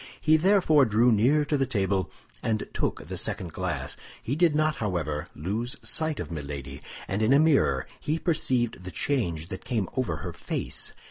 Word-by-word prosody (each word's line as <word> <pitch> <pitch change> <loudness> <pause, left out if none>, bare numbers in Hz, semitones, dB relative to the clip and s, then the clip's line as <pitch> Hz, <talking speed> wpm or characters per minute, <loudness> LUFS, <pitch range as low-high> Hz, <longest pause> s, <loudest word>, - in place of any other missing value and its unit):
He 155 0 +4
therefore 160 -4 +5
drew 115 +2 +4
near 130 +8 +4
to 145 0 +1
the 135 - +1
table 100 -5 0 0.3
and 110 -1 -1
took - - -2
the - - -4
second 85 -4 -3
glass. - - -3 0.3
He 130 - -1
did 165 -1 +3
not, 155 -1 +2
however, 85 -6 -2
lose 110 - -2
sight 155 -1 +1
of - - -5
Milady, 70 -3 -6 0.3
and 95 +3 -1
in 110 +3 +3
a - - +7
mirror 155 -3 +3
he 155 +2 -1
perceived 125 - +1
the 90 - -6
change 85 - -1
that 95 - -6
came 115 -6 -1
over 125 -11 0
her - - -6
face. - - -4
115 Hz, 180 wpm, -27 LUFS, 90-150 Hz, 0.3 s, a